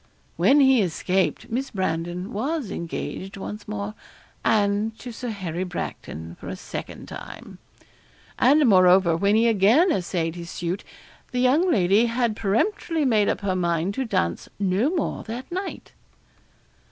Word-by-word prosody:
When 285 +2 +5
he 265 -3 +5
escaped, 185 +3 -1
Miss 265 +4 -2
Brandon 180 0 -3
was 270 +3 -2
engaged 185 +3 -5
once 205 +2 -7
more 105 0 -4 0.5
and 210 +1 +1
to 245 - -8
Sir 245 +2 -5
Harry 185 -5 -3
Bracton, 85 - -6
for - - -9
a - - -4
second 185 - -7
time. - - -10 0.8
And 290 +1 +5
moreover, 185 -3 +5
when 200 +5 +2
he 230 +1 +4
again 230 - +4
essayed 170 - -1
his 170 0 -8
suit, 175 +3 -3 0.5
the 250 - -1
young 290 +9 +3
lady 200 - +4
had 235 -1 0
peremptorily 305 - 0
made 215 -5 +3
up - - -1
her 195 -2 0
mind 170 +1 0
to 265 - -2
dance 85 - -1
no 200 +6 +1
more 335 -3 -2
that 240 +6 -7
night. 375 +2 -5
205 Hz, 145 wpm, -24 LUFS, 180-250 Hz, 0.8 s, When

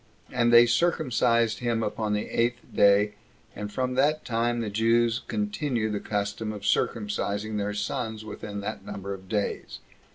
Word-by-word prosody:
And 120 -2 +2
they 120 0 +9
circumcised 120 -5 +2
him 120 -2 0
upon 105 0 -1
the 105 - -1
eighth 120 +1 0
day 100 +1 +5 0.4
and 105 0 -5
from 130 +2 -1
that 145 +4 +2
time 120 0 0
the 105 -3 -3
Jews 115 +2 +2
continue 145 - -1
the 105 - -1
custom 105 +1 -2
of 105 -2 -8
circumcising 105 0 -1
their 105 0 -2
sons 110 +1 -3
within 105 -1 -6
that 100 - -5
number 100 0 -5
of 95 -1 -11
days. 105 -2 -2
110 Hz, 155 wpm, -27 LUFS, 105-120 Hz, 0.4 s, they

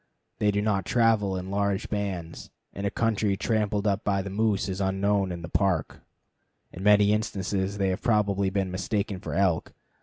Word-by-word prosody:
They 105 - +2
do 105 0 +1
not 100 -3 0
travel 110 -5 +2
in 95 +1 -6
large 100 -1 0
bands, 95 -6 -4 0.2
and 100 +1 -3
a - - +1
country 105 -2 0
tramped 105 -2 0
up 100 0 +1
by 100 -2 0
moose 100 +1 0
is 95 0 -3
unknown 95 0 +1
in 85 -1 -6
the - - -5
Park. 90 -4 0 0.7
In 95 - -8
many 105 0 +5
instances 100 -2 -2
they 95 -1 +1
have 95 +2 -2
probably 100 -4 +2
been 95 -1 -1
mistaken 100 +1 -2
for - - -5
elk. 90 -4 +1
100 Hz, 175 wpm, -27 LUFS, 95-105 Hz, 0.7 s, many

